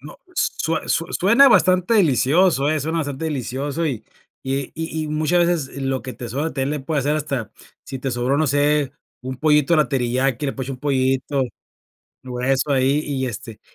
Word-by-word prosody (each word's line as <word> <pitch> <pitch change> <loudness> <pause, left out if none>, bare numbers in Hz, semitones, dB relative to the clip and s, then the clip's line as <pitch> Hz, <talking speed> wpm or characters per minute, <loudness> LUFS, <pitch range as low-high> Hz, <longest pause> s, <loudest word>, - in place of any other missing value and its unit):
No, - - -11 0.2
s - - +1
sue 160 0 -2
sue 165 - 0
suena 235 +9 +6
bastante 185 0 +4
delicioso, 155 - +3
eh, 155 -1 0
suena 160 +4 -2
bastante 145 0 -3
delicioso, 140 +2 -3
y 120 -7 -3 0.4
y 135 0 -2
y 160 0 -3
y - - -5
muchas 155 +3 +2
veces 165 -7 -2
lo 135 -1 -1
que 130 -2 -7
te 120 +2 -7
sobra 140 +6 -2
también 135 -3 -2
le 150 -1 -2
puede 145 +2 -1
hacer 145 +3 0
hasta 140 -7 -3 0.3
sí 135 - -6
te 135 +1 -3
sobró, 125 +3 0
no 155 - +2
sé, 145 0 +2 0.3
un 130 0 -6
pollito 150 +2 +3
a - - +3
la 155 - +3
teriyaki, 130 +1 0
le 135 - -1
puedes 130 -1 -5
echar 135 - -3
un - - -25
pollito 135 0 0 0.8
o 125 -1 -5
eso 135 +3 +1
ahí, 135 +2 +2
y 135 -3 -2
este 115 -1 -7
140 Hz, 200 wpm, -21 LUFS, 130-155 Hz, 0.8 s, suena